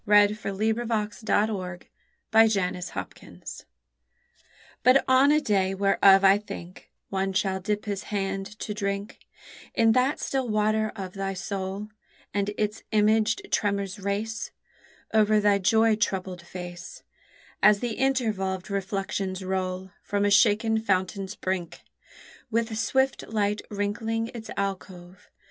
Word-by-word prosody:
A 205 Hz, 0 st, +6 dB
FORETELLING 215 Hz, +2 st, -1 dB
OF 240 Hz, -, -3 dB, 0.4 s
THE 195 Hz, -5 st, -1 dB, 0.6 s
CHILD'S 185 Hz, -4 st, 0 dB
HUSBAND 90 Hz, -1 st, -8 dB, 1.2 s
But 255 Hz, +2 st, +5 dB
on 260 Hz, +2 st, +5 dB
a 305 Hz, -, +5 dB
day 195 Hz, -7 st, +1 dB
whereof 195 Hz, 0 st, +5 dB
I 195 Hz, +1 st, +6 dB
think, 185 Hz, -3 st, -10 dB, 0.2 s
One 195 Hz, 0 st, -1 dB
shall 190 Hz, -1 st, 0 dB
dip 210 Hz, +2 st, -2 dB
his 200 Hz, -2 st, -4 dB
hand 195 Hz, -1 st, -2 dB
to 210 Hz, -, -3 dB
drink 200 Hz, +1 st, -3 dB, 0.6 s
In 225 Hz, -1 st, +4 dB
that 255 Hz, +5 st, +2 dB
still 265 Hz, -3 st, -2 dB
water 215 Hz, 0 st, +1 dB
of 190 Hz, -3 st, -6 dB
thy 195 Hz, -1 st, -3 dB
soul, 195 Hz, +2 st, -4 dB, 0.4 s
And 200 Hz, 0 st, 0 dB
its 210 Hz, 0 st, -1 dB
imaged 215 Hz, 0 st, +2 dB
tremors 200 Hz, -1 st, 0 dB
race 210 Hz, +3 st, -3 dB, 0.6 s
Over 215 Hz, -1 st, +4 dB
thy 205 Hz, -1 st, +3 dB
joy 220 Hz, +3 st, +4 dB
troubled 185 Hz, -4 st, -2 dB
face, 175 Hz, 0 st, -9 dB, 0.6 s
As 210 Hz, -1 st, +6 dB
the 240 Hz, 0 st, -2 dB
intervolved 215 Hz, -8 st, -1 dB
reflections 195 Hz, -1 st, -3 dB
roll 185 Hz, 0 st, -3 dB
From 205 Hz, 0 st, -1 dB
a 205 Hz, -, +2 dB
shaken 220 Hz, +2 st, +4 dB
fountain's 195 Hz, -1 st, -1 dB
brink, 185 Hz, -3 st, -3 dB, 0.7 s
With 230 Hz, -1 st, -1 dB
swift 265 Hz, +4 st, 0 dB
light 210 Hz, -1 st, 0 dB
wrinkling 225 Hz, +3 st, -2 dB
its 225 Hz, -2 st, -8 dB
alcove. 185 Hz, -2 st, -5 dB
205 Hz, 125 wpm, -26 LUFS, 190-220 Hz, 1.2 s, A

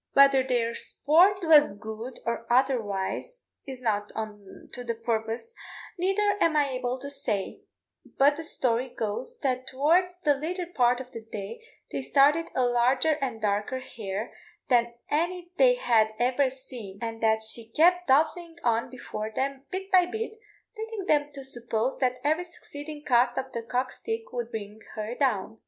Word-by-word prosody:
Whether 275 Hz, -1 st, +7 dB
their 240 Hz, -3 st, 0 dB
sport 360 Hz, -, +3 dB
was 300 Hz, -9 st, +6 dB
good 220 Hz, +3 st, -7 dB
or 235 Hz, 0 st, -3 dB
otherwise, 250 Hz, -, 0 dB, 0.2 s
is 260 Hz, -2 st, -7 dB
not 210 Hz, -2 st, 0 dB
to 215 Hz, +2 st, -7 dB
the 235 Hz, -1 st, -2 dB
purpose, 230 Hz, -, -3 dB, 0.5 s
neither 400 Hz, +3 st, +2 dB
am 325 Hz, -2 st, +3 dB
I 290 Hz, -1 st, +3 dB
able 255 Hz, 0 st, -2 dB
to 280 Hz, -, -6 dB
say; 225 Hz, -9 st, -3 dB, 0.6 s
but 285 Hz, +2 st, +5 dB
the 325 Hz, -, -6 dB
story 255 Hz, -4 st, 0 dB
goes 235 Hz, -, -3 dB
that 255 Hz, -2 st, -1 dB
towards 345 Hz, +7 st, +2 dB
the 295 Hz, -4 st, +4 dB
latter 345 Hz, +6 st, -3 dB
part 250 Hz, -8 st, +2 dB
of 255 Hz, -1 st, -11 dB
the 230 Hz, -, -7 dB
day 215 Hz, -1 st, -7 dB, 0.3 s
they -, -, -2 dB
started 290 Hz, +5 st, +4 dB
a 255 Hz, -, +3 dB
larger 250 Hz, +5 st, +3 dB
and 255 Hz, -5 st, -2 dB
darker 205 Hz, +4 st, 0 dB
hare 215 Hz, -4 st, -5 dB, 0.4 s
than 235 Hz, -2 st, +3 dB, 0.2 s
any 350 Hz, +3 st, -1 dB
they -, -, +6 dB
had 220 Hz, -, +2 dB
ever 255 Hz, +3 st, +2 dB
seen, 250 Hz, -7 st, -9 dB
and 225 Hz, 0 st, -5 dB
that 220 Hz, -1 st, +3 dB
she 225 Hz, +1 st, 0 dB
kept 355 Hz, +7 st, +4 dB
dodging 320 Hz, +4 st, +2 dB
on 230 Hz, -1 st, +1 dB
before 220 Hz, -4 st, -6 dB
them 270 Hz, +3 st, -3 dB
bit 385 Hz, +1 st, -5 dB
by 365 Hz, -2 st, +6 dB
bit, 440 Hz, +3 st, -5 dB, 0.4 s
leading 445 Hz, -3 st, -5 dB
them 295 Hz, -4 st, +2 dB
to 275 Hz, -1 st, -8 dB
suppose 240 Hz, -1 st, -2 dB
that 255 Hz, -1 st, +1 dB
every 315 Hz, +5 st, +1 dB
succeeding 295 Hz, -3 st, -9 dB
cast 245 Hz, 0 st, +3 dB
of 265 Hz, 0 st, -3 dB
the 235 Hz, -, -3 dB
cock 250 Hz, +3 st, -2 dB
stick 450 Hz, 0 st, -5 dB
would 240 Hz, -2 st, -3 dB
bring 210 Hz, -1 st, -6 dB, 0.2 s
her 215 Hz, +2 st, -3 dB
down. 225 Hz, -5 st, -1 dB
260 Hz, 165 wpm, -27 LUFS, 230-310 Hz, 0.6 s, Whether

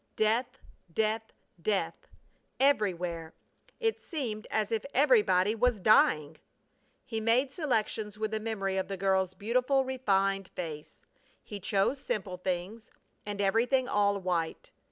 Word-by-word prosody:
Death! 235 Hz, +4 st, +1 dB, 0.3 s
Death! 220 Hz, +3 st, -1 dB, 0.3 s
Death! 200 Hz, +2 st, -1 dB, 0.5 s
Everywhere! 180 Hz, -, +1 dB, 0.4 s
It 450 Hz, -2 st, 0 dB
seemed 240 Hz, -, -4 dB
as 215 Hz, -1 st, -1 dB
if 225 Hz, -2 st, 0 dB
everybody 210 Hz, -8 st, +4 dB
was 230 Hz, -1 st, +1 dB
dying! 155 Hz, -7 st, +4 dB, 0.7 s
He 225 Hz, -1 st, -3 dB
made 245 Hz, +5 st, +2 dB
selections 220 Hz, -, -1 dB
with 215 Hz, 0 st, -2 dB
a 220 Hz, -, 0 dB
memory 200 Hz, -3 st, -2 dB
of 190 Hz, -, -1 dB
the 195 Hz, -, -4 dB
girl's 190 Hz, -1 st, +1 dB
beautiful, 255 Hz, +5 st, +1 dB
refined 195 Hz, -7 st, +1 dB
face. 155 Hz, -4 st, -7 dB, 0.4 s
He 205 Hz, -, -7 dB
chose 200 Hz, +8 st, +1 dB
simple 210 Hz, -9 st, -3 dB
things 185 Hz, +5 st, -4 dB, 0.4 s
and 205 Hz, -1 st, -4 dB
everything 240 Hz, +6 st, +2 dB
all 205 Hz, -3 st, +2 dB
white. 175 Hz, -4 st, -2 dB
215 Hz, 125 wpm, -30 LUFS, 190-235 Hz, 0.7 s, everybody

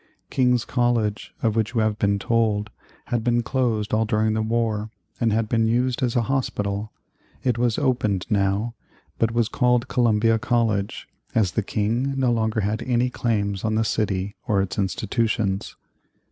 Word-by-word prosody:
King's 125 Hz, -2 st, +2 dB
College, 115 Hz, -4 st, 0 dB
of 110 Hz, -2 st, +2 dB
which 110 Hz, +1 st, 0 dB
you 115 Hz, -, +3 dB
have 110 Hz, -1 st, 0 dB
been 100 Hz, 0 st, +2 dB
told, 110 Hz, -1 st, 0 dB, 0.3 s
had 120 Hz, -2 st, -1 dB
been 120 Hz, 0 st, +2 dB
closed 115 Hz, -4 st, -1 dB
all 110 Hz, +1 st, +3 dB
during 110 Hz, -1 st, +1 dB
the 110 Hz, -, 0 dB
war, 110 Hz, -1 st, -1 dB, 0.3 s
and 115 Hz, -2 st, +2 dB
had 110 Hz, +1 st, +1 dB
been 115 Hz, 0 st, +2 dB
used 125 Hz, +2 st, +1 dB
as 120 Hz, -2 st, 0 dB
a 120 Hz, -, +3 dB
hospital. 105 Hz, -5 st, -2 dB, 0.5 s
It 120 Hz, -2 st, +1 dB
was 120 Hz, -2 st, +1 dB
opened 120 Hz, -9 st, 0 dB
now, 100 Hz, +2 st, 0 dB, 0.5 s
but 115 Hz, -, +3 dB
was 115 Hz, -1 st, +1 dB
called 125 Hz, 0 st, +2 dB
Columbia 115 Hz, -2 st, +3 dB
College, 110 Hz, -5 st, 0 dB, 0.3 s
as 105 Hz, -6 st, +3 dB
the 110 Hz, -, 0 dB
King 115 Hz, +7 st, -1 dB
no 130 Hz, -2 st, +2 dB
longer 110 Hz, -1 st, 0 dB
had 105 Hz, +3 st, -1 dB
any 125 Hz, 0 st, +1 dB
claims 100 Hz, -6 st, -1 dB
on 110 Hz, -1 st, 0 dB
the 110 Hz, -, +2 dB
city 100 Hz, -3 st, -1 dB
or 100 Hz, -2 st, +2 dB
its 95 Hz, 0 st, -2 dB
institutions. 100 Hz, 0 st, -1 dB
110 Hz, 165 wpm, -23 LUFS, 105-120 Hz, 0.5 s, you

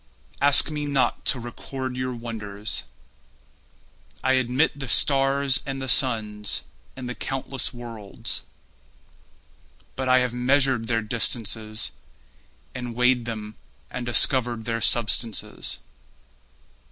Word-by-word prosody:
ask 145 Hz, +2 st, +7 dB
me 150 Hz, -1 st, -3 dB
not 140 Hz, -2 st, +1 dB
to 130 Hz, -, +2 dB
record 130 Hz, +2 st, -5 dB
your 125 Hz, 0 st, -2 dB
wonders, 110 Hz, -3 st, -4 dB, 1.4 s
I 130 Hz, -, +4 dB
admit 130 Hz, +4 st, +2 dB
the 135 Hz, -, -4 dB
stars 135 Hz, +1 st, +3 dB
and 135 Hz, -1 st, -4 dB
the 135 Hz, -, -4 dB
suns 110 Hz, -5 st, +2 dB, 0.3 s
And 130 Hz, -, -6 dB
the 125 Hz, -, -3 dB
countless 135 Hz, +2 st, -3 dB
worlds. 115 Hz, -4 st, -6 dB, 1.5 s
But 130 Hz, -1 st, -2 dB
I 130 Hz, -, +7 dB
have 125 Hz, -1 st, +1 dB
measured 130 Hz, -1 st, +2 dB
their 115 Hz, -1 st, +1 dB
distances 110 Hz, -1 st, -1 dB, 0.8 s
And 125 Hz, -2 st, -5 dB
weighed 125 Hz, 0 st, +3 dB
them 110 Hz, -2 st, -6 dB, 0.3 s
and 125 Hz, -, -4 dB
discovered 120 Hz, 0 st, +2 dB
their 115 Hz, -1 st, -1 dB
substances. 115 Hz, -1 st, 0 dB
125 Hz, 110 wpm, -25 LUFS, 115-130 Hz, 1.5 s, ask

